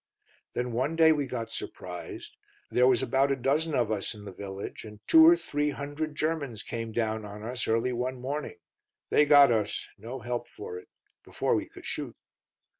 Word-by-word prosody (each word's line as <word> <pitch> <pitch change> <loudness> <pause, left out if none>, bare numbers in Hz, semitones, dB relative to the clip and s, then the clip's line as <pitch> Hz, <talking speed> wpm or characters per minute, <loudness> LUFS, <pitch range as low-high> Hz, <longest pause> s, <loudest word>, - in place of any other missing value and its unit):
"Then 125 0 -2
one 130 +7 0
day 160 -1 +6
we 145 -3 +1
got 115 -3 -4
surprised. 90 -5 -7 0.4
There 125 +1 +4
was 130 0 +4
about 135 +2 +2
a - - +3
dozen 145 +4 0
of 115 -3 +1
us 105 0 -2
in 105 -1 -11
the 100 - -7
village, 95 +1 -7
and 105 -2 -11
two 320 0 +8
or 340 +1 +8
three 150 - -1
hundred 145 +2 -4
Germans 150 -8 -2
came 115 -1 -5
down 110 -1 -1
on 105 +1 -8
us 120 +2 -3
early 115 +3 +1
one 125 +1 -2
morning. 145 - -4 0.5
They 150 - +5
got 145 -3 +8
us; 105 -3 -1
no 120 +5 -7
help 120 +1 -3
for 440 +3 -8
'it. 440 - -17 0.3
Before - - -1
we - - -1
could - - -13
shoot. - - -4
125 Hz, 190 wpm, -28 LUFS, 115-145 Hz, 0.5 s, two